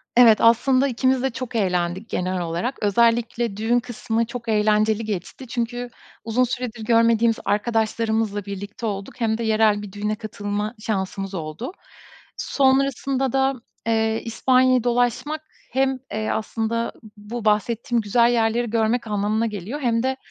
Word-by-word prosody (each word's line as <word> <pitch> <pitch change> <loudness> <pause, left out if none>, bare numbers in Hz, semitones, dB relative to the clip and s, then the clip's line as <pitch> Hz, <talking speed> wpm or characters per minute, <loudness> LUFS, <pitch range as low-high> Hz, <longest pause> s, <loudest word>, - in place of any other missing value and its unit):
Evet. 235 -3 +7
Aslında 255 +4 +4
ikimiz 260 0 +1
de 265 - +2
çok 250 -1 -6
eğlendik 185 0 0
genel 185 0 -1
olarak. 175 +10 -2
Özellikle 230 +1 +2
düğün 230 +3 +2
kısmı 230 -1 -2
çok 235 0 -7
eğlenceli 215 +1 +2
geçti 210 +5 -5
çünkü 240 +1 -3 0.3
uzun 230 +2 +1
süredir 245 -2 -3
görmediğimiz 230 0 +4
arkadaşlarımızla 220 0 0
birlikte 200 +3 -6
olduk 200 -2 -4
hem 220 -1 +1
de 235 - -3
yerel 215 -2 +3
bir 205 -2 -8
düğüne 210 +2 -2
katılma 210 0 -4
şansımız 195 -2 -3
oldu. 165 - -5 0.7
Sonrasında 270 -1 +1
da, 270 0 +2 0.3
eee, 220 0 +1
İspanya'yı 255 +1 +3
dolaşmak 245 +5 0 0.3
hem, 265 +1 +1
eee, 215 0 -2
aslında 225 +1 -2 0.3
bu 215 +2 -7
bahsettiğim 230 +3 +1
güzel 235 +3 +3
yerleri 235 0 +1
görmek 230 +1 +1
anlamına 210 +2 0
geliyor 210 +5 -4
hem 230 -2 +1
de 260 0 0
225 Hz, 135 wpm, -23 LUFS, 210-245 Hz, 0.7 s, Evet